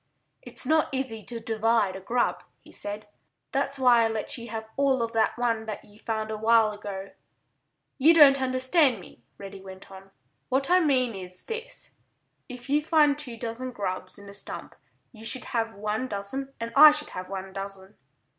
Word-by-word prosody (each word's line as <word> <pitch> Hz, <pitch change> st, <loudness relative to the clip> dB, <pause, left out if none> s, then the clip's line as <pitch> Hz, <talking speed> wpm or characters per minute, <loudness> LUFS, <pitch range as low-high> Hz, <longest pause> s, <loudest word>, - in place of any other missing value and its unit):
"It's -, -, -7 dB
not 315 Hz, 0 st, +2 dB
easy 260 Hz, -5 st, -3 dB
to 235 Hz, +3 st, -5 dB
divide 225 Hz, -3 st, +1 dB
a -, -, -6 dB
grub," 240 Hz, +6 st, -1 dB, 0.2 s
he -, -, -18 dB
said. 205 Hz, +1 st, -6 dB, 0.4 s
"That's 275 Hz, 0 st, 0 dB
why 245 Hz, -3 st, +5 dB
I -, -, +3 dB
let 225 Hz, +4 st, -2 dB
you 235 Hz, -2 st, -8 dB
have 220 Hz, 0 st, -5 dB
all 270 Hz, -3 st, +2 dB
of 230 Hz, -, -3 dB
that 225 Hz, 0 st, +1 dB
one 230 Hz, -2 st, 0 dB
that 215 Hz, -, -6 dB
you 205 Hz, +1 st, -19 dB
found 220 Hz, -1 st, -3 dB
a 215 Hz, -, -3 dB
while 220 Hz, 0 st, +4 dB
ago." 200 Hz, -2 st, -7 dB, 0.9 s
"You 320 Hz, +5 st, +6 dB
don't 275 Hz, -4 st, +8 dB
understand 260 Hz, -, +3 dB
me," 175 Hz, -, -15 dB, 0.2 s
Reddy 195 Hz, -1 st, -9 dB
went 190 Hz, 0 st, -12 dB
on. 190 Hz, 0 st, -12 dB, 0.4 s
"What 270 Hz, +4 st, +1 dB
I 365 Hz, -, +7 dB
mean 260 Hz, -7 st, +2 dB
is 185 Hz, -2 st, -8 dB
this: 465 Hz, +2 st, -6 dB, 0.6 s
If 250 Hz, 0 st, -9 dB
we 290 Hz, +2 st, +2 dB
find 300 Hz, -2 st, +4 dB
two 265 Hz, -6 st, -7 dB
dozen 235 Hz, +2 st, -5 dB
grubs 190 Hz, -4 st, -4 dB
in 200 Hz, 0 st, -13 dB
a 200 Hz, -, -10 dB
stump -, -, -5 dB, 0.4 s
you 220 Hz, -2 st, -14 dB
should 250 Hz, +3 st, -3 dB
have 225 Hz, -1 st, -2 dB
one 215 Hz, +5 st, -2 dB
dozen 255 Hz, +6 st, -5 dB
and 230 Hz, 0 st, -5 dB
I 305 Hz, +2 st, +11 dB
should 300 Hz, 0 st, -2 dB
have 185 Hz, 0 st, -7 dB
one 190 Hz, -1 st, -6 dB
dozen." 195 Hz, 0 st, -8 dB
230 Hz, 185 wpm, -27 LUFS, 205-265 Hz, 0.9 s, I